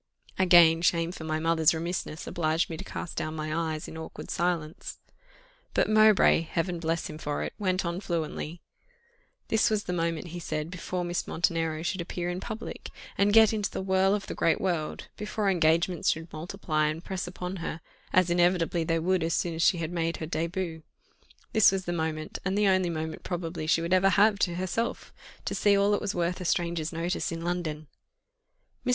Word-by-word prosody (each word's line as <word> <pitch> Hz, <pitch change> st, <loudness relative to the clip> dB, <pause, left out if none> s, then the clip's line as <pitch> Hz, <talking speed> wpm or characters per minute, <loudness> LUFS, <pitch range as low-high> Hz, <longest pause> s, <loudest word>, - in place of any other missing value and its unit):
Again 175 Hz, -3 st, +7 dB
shame 170 Hz, -1 st, +2 dB
for 160 Hz, -, -8 dB
my 155 Hz, 0 st, -1 dB
mother's 165 Hz, 0 st, +3 dB
remissness 165 Hz, -1 st, -4 dB
obliged 160 Hz, 0 st, 0 dB
me 160 Hz, -, -4 dB
to -, -, -6 dB
cast 170 Hz, -, -6 dB
down 155 Hz, 0 st, -2 dB
my 155 Hz, 0 st, -3 dB, 0.2 s
eyes 155 Hz, -, -7 dB
in 160 Hz, -, -8 dB
awkward 160 Hz, -, -8 dB
silence. 170 Hz, -3 st, -2 dB, 0.8 s
But -, -, +3 dB
Mowbray, 215 Hz, -5 st, +6 dB
Heaven 170 Hz, +2 st, -2 dB
bless 165 Hz, 0 st, -1 dB
him 155 Hz, 0 st, -8 dB
for 150 Hz, -1 st, -2 dB
it! -, -, -4 dB
went 185 Hz, -2 st, 0 dB
on 170 Hz, +1 st, -2 dB
fluently. 165 Hz, -2 st, -3 dB, 0.9 s
This 220 Hz, 0 st, +3 dB
was 215 Hz, -2 st, 0 dB
the 180 Hz, -, -3 dB
moment, 165 Hz, -1 st, -2 dB
he 175 Hz, +2 st, -6 dB
said, 155 Hz, -1 st, -3 dB
before 180 Hz, 0 st, -3 dB
Miss 175 Hz, 0 st, -2 dB
Montenero 165 Hz, -1 st, 0 dB
should 180 Hz, +1 st, -1 dB
appear 175 Hz, +1 st, -3 dB
in 180 Hz, -, -4 dB
public, 220 Hz, +2 st, -6 dB, 0.3 s
and 200 Hz, +1 st, +3 dB
get 220 Hz, 0 st, +7 dB
into 210 Hz, -2 st, -1 dB
the -, -, -4 dB
whirl 190 Hz, +1 st, +3 dB
of 205 Hz, -, -4 dB
the -, -, -5 dB
great 165 Hz, -, +2 dB
world, 170 Hz, -5 st, -2 dB
before 210 Hz, -1 st, -1 dB
engagements 170 Hz, 0 st, +2 dB
should 160 Hz, +1 st, -2 dB
multiply 155 Hz, -2 st, -1 dB
and 155 Hz, +3 st, -3 dB
press 185 Hz, -2 st, -3 dB
upon 180 Hz, +1 st, -5 dB
her, 165 Hz, -1 st, -4 dB, 0.3 s
as 185 Hz, -1 st, +3 dB
inevitably 175 Hz, -1 st, +2 dB
they 165 Hz, +1 st, +1 dB
would 180 Hz, +3 st, +1 dB
as 165 Hz, 0 st, 0 dB
soon 170 Hz, -, -1 dB
as 160 Hz, -, -3 dB
she 175 Hz, -, +4 dB
had 165 Hz, 0 st, -3 dB
made 165 Hz, -1 st, -1 dB
her 160 Hz, -, -4 dB
début 165 Hz, +1 st, -3 dB, 0.7 s
this 215 Hz, -3 st, +6 dB
was 190 Hz, -1 st, -2 dB
the 175 Hz, -, -2 dB
moment, 160 Hz, -2 st, -3 dB
and 190 Hz, +1 st, -1 dB
the 210 Hz, -, +3 dB
only 185 Hz, -2 st, +3 dB
moment 160 Hz, -1 st, -4 dB
probably 165 Hz, -2 st, -4 dB
she 165 Hz, -, +3 dB
would 170 Hz, +2 st, 0 dB
ever 190 Hz, +1 st, +5 dB
have 205 Hz, +1 st, +4 dB
to 175 Hz, -4 st, +1 dB
herself, 185 Hz, +6 st, -3 dB, 0.3 s
to -, -, -2 dB
see 205 Hz, -1 st, +3 dB
all 200 Hz, +1 st, +3 dB
that 205 Hz, -, +1 dB
was 205 Hz, -2 st, -2 dB
worth 175 Hz, +1 st, -1 dB
a -, -, -5 dB
stranger's 170 Hz, -2 st, 0 dB
notice 170 Hz, +2 st, -2 dB
in 165 Hz, 0 st, -5 dB
London. 170 Hz, -3 st, -3 dB, 1.0 s
Mr. 250 Hz, -, -2 dB
170 Hz, 195 wpm, -28 LUFS, 160-185 Hz, 1.0 s, Again